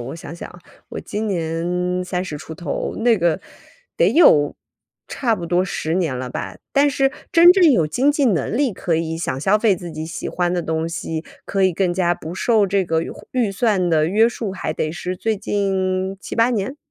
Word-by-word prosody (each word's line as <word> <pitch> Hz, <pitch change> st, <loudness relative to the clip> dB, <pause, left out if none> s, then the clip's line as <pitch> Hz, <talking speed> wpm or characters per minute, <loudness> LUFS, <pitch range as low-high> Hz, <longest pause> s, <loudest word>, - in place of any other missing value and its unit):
我 130 Hz, +6 st, -6 dB
想 165 Hz, -, -9 dB
想， 175 Hz, 0 st, -10 dB, 0.3 s
我 -, -, -6 dB
今 215 Hz, +1 st, -4 dB
年 180 Hz, +1 st, -1 dB
30 180 Hz, -4 st, -3 dB
出 160 Hz, +2 st, -9 dB
头。 155 Hz, -3 st, -4 dB
那 230 Hz, 0 st, +3 dB
个， 170 Hz, -2 st, +1 dB, 0.6 s
得 -, -, +4 dB
有 150 Hz, -, +5 dB, 0.5 s
差 235 Hz, -5 st, 0 dB
不 170 Hz, -2 st, -6 dB
多 175 Hz, +2 st, +2 dB
10 165 Hz, -3 st, -3 dB
年 165 Hz, -8 st, 0 dB
了 125 Hz, 0 st, -4 dB
吧， -, -, -6 dB, 0.2 s
但 285 Hz, +1 st, +4 dB
是 270 Hz, 0 st, +1 dB, 0.2 s
真 345 Hz, +1 st, +8 dB
正 360 Hz, -5 st, +5 dB
有 170 Hz, -, +3 dB
经 260 Hz, -, +2 dB
济 290 Hz, -1 st, +1 dB
能 205 Hz, -, +1 dB
力 270 Hz, -5 st, +1 dB
可 170 Hz, -2 st, -1 dB
以 165 Hz, 0 st, -2 dB
想 140 Hz, -5 st, -3 dB
消 195 Hz, +8 st, +3 dB
费 210 Hz, -3 st, +2 dB
自 170 Hz, -1 st, -8 dB
己 155 Hz, +1 st, -5 dB
喜 165 Hz, -, -5 dB
欢 175 Hz, -1 st, -1 dB
的 180 Hz, -, 0 dB
东 160 Hz, 0 st, -2 dB
西， 165 Hz, -1 st, -4 dB, 0.2 s
可 195 Hz, -1 st, -1 dB
以 185 Hz, -1 st, +3 dB
更 175 Hz, 0 st, 0 dB
加 175 Hz, -1 st, +1 dB
不 165 Hz, +1 st, -8 dB
受 215 Hz, 0 st, +2 dB
这 195 Hz, 0 st, +1 dB
个 160 Hz, -1 st, 0 dB
胡 -, -, -15 dB
预 235 Hz, -6 st, 0 dB
算 195 Hz, -4 st, +1 dB
的 155 Hz, -2 st, +3 dB
约 220 Hz, +5 st, +4 dB
束， 230 Hz, -3 st, -4 dB
还 190 Hz, -, -3 dB
得 155 Hz, -, -2 dB
是 180 Hz, +2 st, -5 dB
最 220 Hz, +2 st, -1 dB
近 190 Hz, -2 st, -1 dB
7-8 230 Hz, +1 st, +1 dB
年。 240 Hz, +4 st, -2 dB
185 Hz, 210 characters per minute, -20 LUFS, 165-220 Hz, 0.6 s, 真